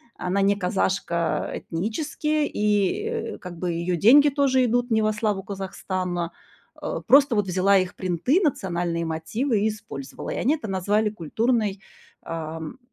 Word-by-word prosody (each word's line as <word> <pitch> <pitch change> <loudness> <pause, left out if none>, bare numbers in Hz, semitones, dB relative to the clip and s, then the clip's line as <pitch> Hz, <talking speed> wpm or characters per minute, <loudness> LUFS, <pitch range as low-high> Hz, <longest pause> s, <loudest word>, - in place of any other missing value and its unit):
Она 190 +2 -1
не 200 +1 +3
казашка 180 -3 -1
этнически, 295 - -2
и, 210 - +1
э, 460 -1 -4
как 180 -2 -9
бы 175 0 -2
её 170 +1 -1
деньги 285 - +7
тоже 270 -2 +2
идут 245 +1 +1
не 220 0 +3
во 215 0 +2
славу 210 -3 -1
Казахстана. 185 -3 -3 0.5
Э, - - -3
просто 275 -3 +6
вот 205 -2 +1
взяла 190 +2 +3
их 185 -1 -1
принты, 185 - +1
национальные 175 - -1
мотивы 200 - -1
и 215 - +2
использовала. 200 -11 -7
И - - -3
они 285 +6 +2
это 280 -8 -7
назвали 205 +3 +1
культурной, 210 +2 -1 0.4
эм, 160 +3 -6
200 Hz, 150 wpm, -24 LUFS, 180-240 Hz, 0.5 s, деньги